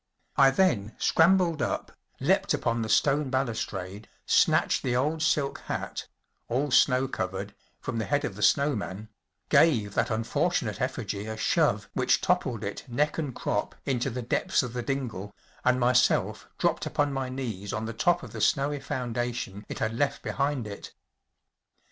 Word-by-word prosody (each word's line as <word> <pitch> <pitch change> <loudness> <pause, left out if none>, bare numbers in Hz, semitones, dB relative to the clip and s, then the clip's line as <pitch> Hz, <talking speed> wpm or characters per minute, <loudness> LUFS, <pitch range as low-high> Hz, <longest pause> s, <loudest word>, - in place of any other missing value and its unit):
I 135 -1 +7
then 135 - +1
scrambled 170 -2 +3
up, 120 - -2 0.3
leapt - - +2
upon 115 0 -1
the 110 - -3
stone 140 +5 +3
balus¬ 130 -4 -1
trade, 95 +2 -7 0.2
snatched - - +3
the 125 -2 -1
old 150 +5 0
silk 145 -3 +1
hat‚ÄĒall 130 +3 -4
snow 130 +1 +4
covered‚ÄĒfrom 100 +3 -5
the 110 - -1
head 145 0 0
of - - -4
the - - -8
snow 140 -1 +3
man, 105 0 -6 0.4
gave 110 -11 +4
that - - +1
unfortunate 110 0 -1
effigy 100 +2 -3
a 110 0 -5
shove - - +1
which - - +2
toppled - - 0
it - - -5
neck 150 +6 0
and 145 -6 -3
crop 105 - -2
into 130 -1 0
the 125 0 -4
depths 115 - +1
of 120 -2 -5
the 125 - -2
dingle, 115 -7 -4 0.3
and 125 0 +3
myself 125 0 +2
dropped - - 0
upon 145 -1 0
my 135 -1 -2
knees 115 -7 -4
on 110 - -3
the 115 - -4
top 175 +9 +2
of - - -9
the 110 - -6
snowy 140 +6 +2
foundation 120 -6 -3
it - - -5
had 110 -3 -1
left 140 +4 -1
behind 140 -3 -1
it. 100 -1 -8
125 Hz, 160 wpm, -27 LUFS, 110-140 Hz, 0.4 s, I